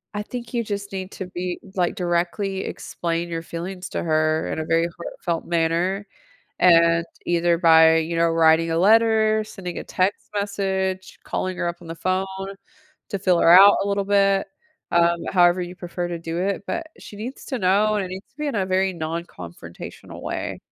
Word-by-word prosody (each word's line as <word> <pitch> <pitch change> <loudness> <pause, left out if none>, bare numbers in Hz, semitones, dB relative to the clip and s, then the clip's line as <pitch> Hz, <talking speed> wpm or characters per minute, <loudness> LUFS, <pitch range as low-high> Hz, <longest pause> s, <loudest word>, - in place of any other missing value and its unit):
I 205 - -1
think 240 +3 -7
you 235 -1 0
just 200 -2 -5
need 190 0 -5
to 190 - -6
be 180 0 -4 0.2
like, 180 -2 0
directly 180 +2 -1
explain 170 0 -4
your 165 -1 -3
feelings 180 +3 -6
to - - -3
her 155 -1 +1
in - - -3
a 160 - -3
very 165 +1 +2
heartfelt 170 -1 -4
manner, 170 +4 0 0.5
and 170 -1 +5 0.2
either 170 0 +2
by, 160 -1 +6
you 165 +1 -2
know, 170 0 +3
writing 165 0 +4
a 165 - +1
letter, 220 +2 +4
sending 190 -4 -7
a - - -6
text 185 +2 -1
message, 190 -2 -2
calling 185 0 -3
her 175 - 0
up 170 - -4
on 170 - -12
the 165 - -5
phone 185 +2 0 0.8
to 200 - -3
feel 185 -3 +2
her - - +4
out 200 +1 +8
a - - -3
little 200 0 0
bit, 195 0 +2 0.4
um, 170 0 +3
however 175 0 +4
you 175 0 -5
prefer 175 0 -4
to 170 -1 -4
do 165 0 -5
it, 195 +2 -1
but 335 -1 -3
she - - -11
needs 235 +6 -7
to 260 - -3
know, 205 +3 +3
and 205 - 0
it - - -8
needs 190 +1 -8
to - - -42
be 300 0 -2
in 280 - -2
a 195 -2 0
very 190 +1 +1
non-confrontational 155 - -8
way. - - -4
180 Hz, 190 wpm, -23 LUFS, 170-200 Hz, 0.8 s, out